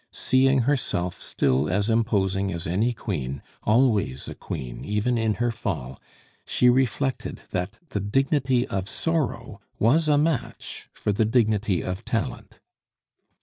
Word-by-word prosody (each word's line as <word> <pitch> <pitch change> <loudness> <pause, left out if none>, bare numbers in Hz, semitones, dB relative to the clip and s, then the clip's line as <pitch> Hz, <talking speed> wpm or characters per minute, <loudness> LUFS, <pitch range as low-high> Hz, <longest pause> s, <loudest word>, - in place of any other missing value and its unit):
Seeing 130 +1 +3
herself 115 -9 -1
still 70 +2 +1
as 100 +2 +1
imposing 100 -4 +1
as 85 0 -4
any 100 +7 +1
queen, 75 - -4 0.2
always 105 - +2
a - - -5
queen - - -6
even 105 +4 0
in 110 -2 +1
her 120 0 0
fall, 80 - -4 0.4
she 125 0 +4
reflected 130 +1 -1
that 90 +4 -3
the 105 - -2
dignity 130 +4 +1
of 95 +1 -3
sorrow 125 -10 -2 0.2
was 155 +9 +3
a 150 -1 +4
match 150 -4 -2
for 105 - -2
the 100 +2 +2
dignity 110 -5 +2
of 90 +1 -4
talent. - - -3
110 Hz, 135 wpm, -25 LUFS, 95-125 Hz, 0.4 s, she